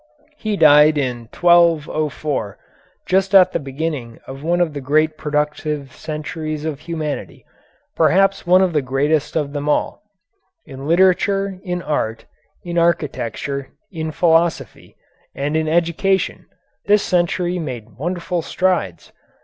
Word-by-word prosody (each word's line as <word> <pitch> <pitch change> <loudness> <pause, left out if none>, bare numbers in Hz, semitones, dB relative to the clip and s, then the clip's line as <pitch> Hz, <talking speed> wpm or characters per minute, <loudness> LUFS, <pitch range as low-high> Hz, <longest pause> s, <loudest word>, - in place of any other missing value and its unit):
He 215 -5 -2
died 150 0 +6
in 120 -5 -3
1204, 155 - +2 0.5
just 190 +1 +1
at 185 -2 +7
the - - -1
beginning 140 -4 -5
of 135 +1 -9
one 170 +3 0
of 170 -4 +1
the 145 - -5
great 155 +3 +1
productive 150 -2 -2
centuries 155 0 -5
of 150 -3 -3
humanity, 155 -3 -5 0.5
perhaps 195 0 +2
one 185 +2 +6
of 180 -3 0
the 150 - +2
greatest 140 +3 0
of 145 -3 -1
them 145 0 -3
all. - - 0 0.6
In 135 -1 -9
literature, 190 +2 +2
in 180 -2 -3
art, 115 -7 -2 0.4
in 175 -1 -1
architecture, 140 -4 -1 0.2
in 160 -3 -4
philosophy, 165 +1 0 0.4
and 145 +2 -2
in 160 0 0
education, 170 +4 0 0.4
this 205 0 +4
century 175 0 0
made 120 -8 -7
wonderful 175 +4 -3
strides. 170 - -1
155 Hz, 125 wpm, -19 LUFS, 145-175 Hz, 0.6 s, at